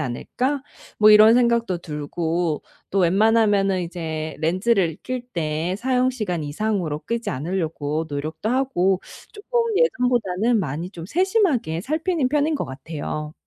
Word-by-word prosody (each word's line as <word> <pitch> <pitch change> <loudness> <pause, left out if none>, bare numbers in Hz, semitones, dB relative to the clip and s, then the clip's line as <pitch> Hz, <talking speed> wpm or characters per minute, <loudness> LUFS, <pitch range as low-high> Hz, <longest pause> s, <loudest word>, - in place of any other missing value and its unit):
않을까?' 255 - -2 0.4
뭐 215 0 +7
이런 215 +2 +8
생각도 235 -5 +2
들고. 160 +1 -2 0.3
또 195 - +1
웬만하면은 200 +1 +3
이제 160 -3 -5
렌즈를 185 0 +1
낄 255 -1 -4
때 160 +1 -1
사용 255 +1 +1
시간 185 -10 -3
이상으로 160 -1 -2
끼지 235 0 -2
않으려고 155 0 -2
노력도 155 +7 -3
하고 215 -8 +1 0.3
쪼끔 470 +3 -1 0.2
예전보다는 240 - +2
많이 160 +3 -4
좀 170 -4 -9
세심하게 335 - +1
살피는 310 - 0
편인 295 +3 +1
것 - - -2
같아요. 150 +2 -6
190 Hz, 295 characters per minute, -22 LUFS, 160-245 Hz, 0.4 s, 이런